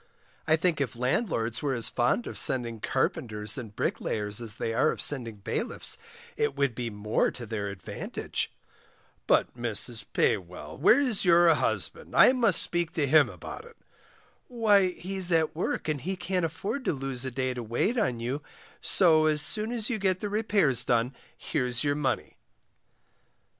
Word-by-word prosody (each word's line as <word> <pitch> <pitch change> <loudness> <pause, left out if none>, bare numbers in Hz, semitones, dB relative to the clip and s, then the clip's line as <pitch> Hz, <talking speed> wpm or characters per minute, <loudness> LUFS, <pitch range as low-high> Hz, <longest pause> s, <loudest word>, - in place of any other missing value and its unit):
I 160 - +5
think 165 -2 0
if 130 -2 -2
landlords 120 - -1
were 140 -3 0
as 115 - 0
fond 125 - +1
of - - -6
sending 120 -3 -1
carpenters 110 -5 -1
and 110 -5 -7
bricklayers 105 +1 -2
as 110 -2 -3
they 115 - -3
are 125 - +3
of - - -3
sending 120 -6 -2
bailiffs, 105 - -3 0.4
it 445 -1 0
would 140 -4 +1
be 120 0 -4
more 105 0 0
to 120 - -8
their 105 -2 -3
advantage. 95 -3 -4 0.8
But, - - +2
Mrs 120 0 -2
Paywell, 85 -5 -1
where's 250 -4 +4
your 170 -2 +6
husband, - - -2
I 255 - +8
must 230 -8 +3
speak 170 -1 -1
to 150 - +1
him 150 +1 +5
about - - -9
it. 470 0 -16 0.7
Why, 210 -6 +3
he's 185 0 0
at 160 -2 +2
work, 165 - -2
and 150 -3 -1
he 190 +2 -3
can't 180 -1 -1
afford 195 - -4
to - - +1
lose 135 -2 -2
a 130 - -1
day 130 0 -2
to 125 - -5
wait 120 - 0
on 125 - 0
you, 125 +5 -3 0.4
so 160 -4 +4
as 150 -1 +2
soon 215 +1 0
as 235 0 -1
you 220 - -1
get 190 -2 +1
the 205 - -3
repairs 205 - +1
done 120 +2 +1 0.2
here's 125 -5 0
your 145 -1 +2
money. 145 -3 -2
145 Hz, 170 wpm, -28 LUFS, 120-185 Hz, 0.8 s, I